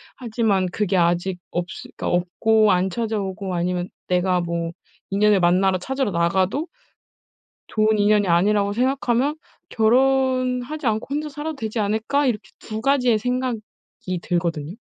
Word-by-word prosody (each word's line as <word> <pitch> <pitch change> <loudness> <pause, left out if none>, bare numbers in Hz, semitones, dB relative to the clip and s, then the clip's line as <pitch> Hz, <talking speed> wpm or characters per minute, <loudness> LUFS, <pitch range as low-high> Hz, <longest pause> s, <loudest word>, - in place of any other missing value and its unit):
하지만 220 -6 0
그게 200 0 -1
아직 175 +1 +1
없으 175 +1 -5
그러니까 - - -3
없고 210 +5 +2
안 185 +1 +2
찾아오고 200 -2 -3
아니면 180 +1 -1 0.2
내가 180 0 +2
뭐 170 -1 -2 0.4
인연을 205 0 +3
만나러 185 +2 +3
찾으러 265 +4 -2
나가도 185 - +1 1.0
좋은 215 0 +2
인연이 205 -1 +3
아니라고 200 +4 +2
생각하면 260 +3 +1 0.3
'결혼 255 +2 +2
하지 300 +2 -6
않고 220 0 0
혼자 300 +1 -2
살아도 300 +1 -5
되지 220 -1 -4
않을까?' 220 +8 0
이렇게 235 -5 -2
2 220 0 -6
가지의 250 -4 +3
생각이 250 -1 -2 0.6
들거든요. 170 -2 -2
210 Hz, 325 characters per minute, -22 LUFS, 180-250 Hz, 1.0 s, 인연을